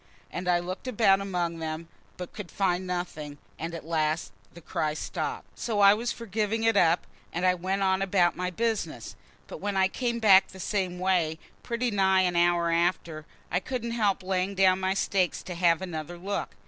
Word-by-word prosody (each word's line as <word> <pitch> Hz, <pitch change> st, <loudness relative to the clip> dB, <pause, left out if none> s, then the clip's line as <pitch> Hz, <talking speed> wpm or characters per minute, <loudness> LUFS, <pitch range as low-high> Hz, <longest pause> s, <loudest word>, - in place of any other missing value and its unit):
And 180 Hz, +1 st, -5 dB
I 175 Hz, -1 st, +4 dB
looked 185 Hz, +7 st, -5 dB
about 205 Hz, -5 st, +3 dB
among 175 Hz, -4 st, -2 dB
them, 160 Hz, +1 st, -4 dB, 0.3 s
but 180 Hz, -1 st, -7 dB
could 205 Hz, -5 st, -7 dB
find 185 Hz, -1 st, 0 dB
nothing, 160 Hz, -5 st, -4 dB, 0.2 s
and 165 Hz, +1 st, -4 dB
at 165 Hz, -, -8 dB
last 155 Hz, -6 st, -1 dB, 0.2 s
the 170 Hz, -, -13 dB
cry 155 Hz, -2 st, -2 dB
stopped. -, -, -5 dB
So 220 Hz, -3 st, -1 dB
I 200 Hz, 0 st, +8 dB
was 235 Hz, +3 st, -2 dB
for 235 Hz, -, -7 dB
giving 215 Hz, +1 st, -1 dB
it 225 Hz, -1 st, +3 dB
up, 170 Hz, -3 st, +3 dB, 0.3 s
and 175 Hz, +2 st, -1 dB
I 185 Hz, -, +5 dB
went 190 Hz, +2 st, -1 dB
on 190 Hz, 0 st, +2 dB
about 185 Hz, -3 st, +2 dB
my 180 Hz, +1 st, -2 dB
business. 225 Hz, +4 st, -2 dB, 0.3 s
But -, -, -9 dB
when 200 Hz, -1 st, -2 dB
I 190 Hz, 0 st, +4 dB
came 235 Hz, +4 st, -2 dB
back 195 Hz, -4 st, +6 dB
the 190 Hz, -, -13 dB
same 185 Hz, -2 st, -1 dB
way 180 Hz, -4 st, +1 dB, 0.2 s
pretty 235 Hz, 0 st, -2 dB
nigh 190 Hz, -2 st, +3 dB
an 180 Hz, -1 st, +1 dB
hour 170 Hz, 0 st, +3 dB
after, 165 Hz, -2 st, 0 dB, 0.2 s
I 180 Hz, -, +2 dB
couldn't 235 Hz, +3 st, -4 dB
help 205 Hz, -5 st, +1 dB
laying 190 Hz, +1 st, -1 dB
down 190 Hz, -1 st, +4 dB
my 190 Hz, 0 st, 0 dB
stakes 190 Hz, -2 st, 0 dB
to 180 Hz, -, -6 dB
have 170 Hz, 0 st, +2 dB
another 175 Hz, -1 st, -5 dB
look. 195 Hz, +3 st, -4 dB
185 Hz, 195 wpm, -27 LUFS, 175-200 Hz, 0.3 s, I